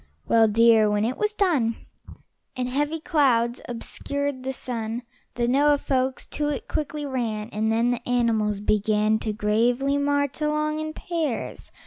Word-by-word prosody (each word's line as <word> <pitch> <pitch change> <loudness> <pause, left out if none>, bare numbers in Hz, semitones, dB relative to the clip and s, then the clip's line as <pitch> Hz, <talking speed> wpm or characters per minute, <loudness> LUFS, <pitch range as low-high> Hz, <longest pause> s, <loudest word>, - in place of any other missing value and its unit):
Well, 225 -1 +5
dear, 225 0 +5
when 210 +1 +1
it 245 +3 -1
was 425 0 0
done, 290 - +2 0.8
And 250 -1 -2
heavy 295 +5 -1
clouds 260 -8 +2
obscured 280 +3 -3
the 265 +1 -3
sun, 235 -2 -4 0.3
The 240 -1 0
Noah 290 +3 +4
folks 260 -2 -1
to 295 -1 -2
it 285 - -4
quickly 300 0 -3
ran, 230 -5 -3
And 220 +1 -1
then 230 +2 +2
the 245 0 -4
animals 220 -4 +1
began 215 +1 +2
To 220 - -2
gravely 240 +6 +1
march 285 0 0
along 305 0 0
in 310 0 -4
pairs. 320 -8 -4
250 Hz, 150 wpm, -24 LUFS, 225-285 Hz, 0.8 s, Well